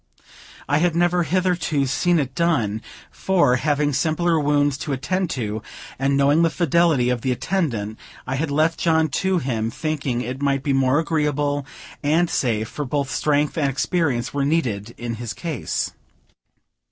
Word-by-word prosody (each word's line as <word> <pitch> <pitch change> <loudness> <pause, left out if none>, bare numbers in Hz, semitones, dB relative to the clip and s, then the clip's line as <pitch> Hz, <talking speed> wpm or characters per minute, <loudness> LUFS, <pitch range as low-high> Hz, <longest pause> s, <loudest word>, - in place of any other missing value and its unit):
I 145 +2 +2
had 170 0 +1
never 175 +1 +2
hitherto 175 -3 +1
seen 175 +6 +2
it 135 -4 -1
done; 130 -11 0 0.3
for, 170 -10 +2
having 145 +1 +1
simpler 165 +3 +1
wounds 145 -1 +2
to 145 - -3
attend 180 +7 -1
to, 110 -2 -3 0.4
and 135 +1 +2
knowing 140 +3 +4
the 165 - +4
fidelity 165 -6 +2
of 125 -2 -1
the 130 - 0
attendant, 125 - -2 0.3
I 130 - -3
had 145 +3 -1
left 155 +3 +1
John 160 -2 +2
to 190 +6 0
him, 115 -7 -1
thinking 140 -4 -2
it 130 +3 -5
might 140 -1 +1
be 140 - +1
more 135 +1 +3
agreeable 145 -3 0 0.3
and 160 +4 +2
safe; 110 -4 0
for 150 - -5
both 140 0 -2
strength 150 +1 +1
and 140 -2 +2
experience 135 -3 -1
were 140 -1 0
needed 120 -8 -1
in 115 -1 -4
his 120 -2 -4
case. 160 -7 -3
145 Hz, 160 wpm, -22 LUFS, 130-165 Hz, 0.4 s, knowing